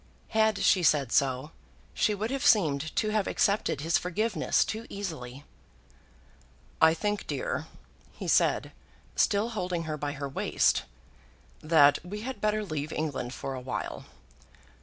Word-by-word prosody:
Had 220 -2 +2
she 185 - +4
said 145 -6 +3
so, 135 +1 +1 0.4
she 210 - +1
would 215 +4 -3
have 275 0 -2
seemed 160 - +3
to 215 - +1
have 215 -2 0
accepted 200 -8 +1
his 165 +2 +2
forgiveness 210 +6 0
too 225 +2 -5
easily. 145 -10 -6 1.4
"I 160 0 +6
think, 210 +4 -2
dear," - - -3 0.4
he - - -8
said, - - +2 0.4
still 205 +3 +2
holding 180 -6 -2
her 155 -1 -4
by 145 -1 -3
her 140 -1 -4
waist, 135 - +1 0.8
"that 150 -2 +5
we 205 +4 -6
had 255 -3 -6
better 215 0 0
leave 155 -3 -4
England 140 -5 -3
for 135 - -5
a 130 - -5
while. 125 - -5
170 Hz, 140 wpm, -28 LUFS, 145-210 Hz, 1.4 s, I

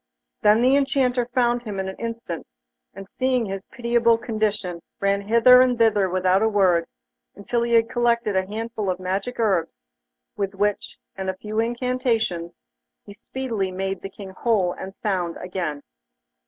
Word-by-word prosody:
Then 215 +1 +5
the 260 +2 +5
Enchanter 265 -3 +1
found 240 -1 +1
him 210 -5 -5
in 190 - -2
an 190 - -5
instant, 230 -8 -5 0.5
and 195 0 -9
seeing 255 +1 0
his 195 -1 -5
pitiable 235 -2 +2
condition, 215 -6 -2 0.2
ran 200 0 +1
hither 235 +4 +6
and 250 -1 +3
thither 210 -4 +3
without 185 +1 +2
a 220 - +3
word, 185 -5 +3 0.5
until 210 +4 -2
he 235 0 0
had 230 -1 +5
collected 235 -3 +1
a 190 0 +1
handful 220 -1 -4
of 180 0 -1
magic 195 +7 -3
herbs, 195 -7 +1 0.6
with 195 -1 -3
which, 205 +1 -1 0.2
and 190 -1 -3
a 190 - -3
few 215 +2 -4
incantations, 235 -7 -1 0.5
he 200 - -11
speedily 225 -3 -3
made 190 +1 -3
the 195 - -6
King 195 0 -10
whole 190 -3 +1
and 190 +1 -8
sound 180 -5 -2
again. 175 -6 -4
210 Hz, 160 wpm, -23 LUFS, 190-235 Hz, 0.6 s, hither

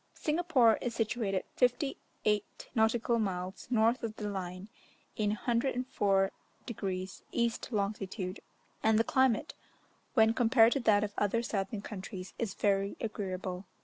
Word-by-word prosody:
Singapore 300 -8 +3
is 240 -2 -3
situated 215 -4 0
58' 245 -5 -1
(nautical 230 +1 +2
miles) 185 -2 -3
north 230 +1 +3
of 220 -2 -4
the 210 - -4
line, 185 -1 -5 0.5
in 210 -1 +1
104 230 -4 +1 0.3
degrees 190 -4 -4
East 235 +1 -1
longitude, 200 -2 -2 0.4
and 220 0 +4
the 225 - +4
climate, 260 -2 +2 0.6
when 220 -1 +5
compared 230 -1 +5
to 275 - 0
that 215 -4 +4
of 205 -1 -3
other 220 +3 +1
southern 200 -2 -2
countries, 190 -2 -7
is 215 -5 -2
very 200 -1 +1
agreeable. 190 -3 -4
215 Hz, 125 wpm, -32 LUFS, 195-235 Hz, 0.6 s, when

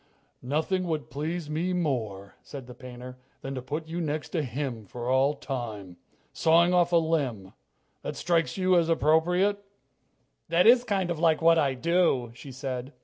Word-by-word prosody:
"Nothing 160 +8 -1
would 155 -3 -3
please 155 +4 -3
me 165 +4 -1
more," 110 - -2
said 135 -3 -9
the 125 - -11
painter, 125 0 -10 0.2
"than 135 - -5
to 130 - -4
put 150 +5 -5
you 170 +2 -4
next 155 -1 -3
to 165 - -1
him 125 -5 -4
for 120 +4 -6
all 135 +3 +3
time. 110 -10 -6 0.4
Sawing 170 +2 +4
off 175 -1 +3
a - - +3
limb 140 - 0 0.5
that - - -5
strikes 170 0 0
you 185 -1 +3
as 170 -1 +3
appropriate?" 180 +6 +2 0.9
"That 170 +2 +3
is 240 +2 +7
kind 195 -6 -1
of 165 - -3
like 160 -2 +3
what 165 0 +5
I 135 -3 +1
do," 165 -5 +1
she 135 +3 -11
said. 130 0 -5
155 Hz, 170 wpm, -27 LUFS, 130-170 Hz, 0.9 s, is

